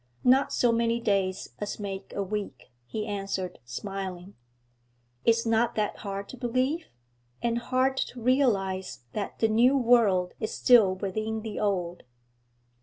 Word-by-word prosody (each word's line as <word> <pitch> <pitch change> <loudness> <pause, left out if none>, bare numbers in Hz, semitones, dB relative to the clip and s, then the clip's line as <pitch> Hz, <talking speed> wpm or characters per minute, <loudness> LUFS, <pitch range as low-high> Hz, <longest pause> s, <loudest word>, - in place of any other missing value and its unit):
'Not 260 +2 +4
so 245 - +3
many 230 0 +1
days 195 -4 0
as 205 +1 -4
make 195 -1 -6
a 200 - 0
week,' 195 - -5 0.2
he 215 - -3
answered, 195 - -3
smiling. 190 - -6 0.9
'Is 230 0 +3
not 225 +1 +2
that 210 -1 -1
hard 200 0 -5
to 255 - -9
believe? 255 +7 -1 0.6
And 235 0 +1
hard 260 +2 +1
to 250 - -3
realise 200 - +1
that 205 - -4
the 225 - +3
new 240 +5 +4
world 225 -8 +3
is 220 - -3
still 220 -7 +5
within 215 +3 -3
the 220 -2 -5
old?' 180 -4 -1
215 Hz, 140 wpm, -28 LUFS, 195-235 Hz, 0.9 s, still